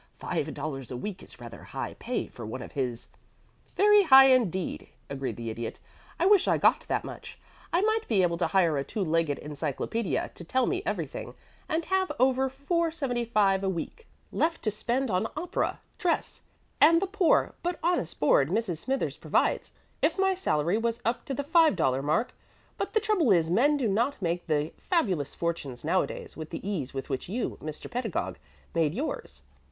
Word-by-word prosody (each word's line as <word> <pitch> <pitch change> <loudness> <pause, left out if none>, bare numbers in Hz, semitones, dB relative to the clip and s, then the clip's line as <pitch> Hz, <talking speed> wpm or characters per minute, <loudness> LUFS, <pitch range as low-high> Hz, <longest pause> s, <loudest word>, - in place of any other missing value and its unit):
"Five - - -3
dollars 135 -5 -5
a 125 - -4
week 190 +6 -5
is - - -12
rather 120 -1 -10
high - - -5
pay - - -2
for 120 - -11
one 115 +4 -5
of - - -10
his 125 -4 -3 0.3
" - - -34
"Very 420 0 +7
high 270 -6 +8
indeed," 190 -8 0 0.2
agreed 135 -1 -3
the 115 -1 -5
Idiot. 115 +1 -5 0.4
"I 340 - +2
wish 400 -1 +5
I - - +3
got - - +3
that - - 0
much. - - -9 0.3
I 345 - +3
might 440 +1 +1
be 200 -5 +3
able 170 -1 +1
to - - +2
hire 170 -6 +3
a - - -1
two 200 +8 -3
legged 165 -3 +1
encyclopædia 150 - -2
to - - -9
tell 255 +9 +1
me 370 0 -1
everything, - - -4 0.3
and 320 +1 0
have 380 0 +1
over 265 +1 +3
$4.75 260 - 0
a 195 - 0
week 190 - -5 0.2
left 330 +1 0
to 215 - +1
spend 240 +4 -1
on 185 +4 +1
opera, 345 +3 -2 0.2
dress, 355 -5 -1 0.4
and 330 +3 +7
the 390 - 0
poor 385 -3 +2
but 350 0 -2
honest 335 - 0
board 145 -1 +4
Mrs. 190 -4 -1
Smithers 265 +8 -2
provides, - - 0 0.3
if - - +2
my 385 0 +3
salary 190 - +1
was 230 0 -1
up 230 +2 -1
to 270 - -3
the 285 - -2
$5 205 - +3
mark; 155 - 0 0.4
but - - -4
the 440 - +4
trouble 410 - +2
is 165 -3 +3
men 285 +10 +4
do 255 -5 0
not 235 +8 0
make 175 -2 -2
the 150 0 0
fabulous 190 - 0
fortunes 150 -7 -3
nowadays 185 +4 -1
with 155 -1 -7
the - - -6
ease 160 -11 -2
with 135 -1 -5
which 135 +5 -3
you, 235 +5 -3
Mr. 155 -1 -6
Pedagog, 240 -6 -3 0.3
made 160 -2 +1
yours. 290 +7 -5
210 Hz, 185 wpm, -28 LUFS, -, 0.4 s, high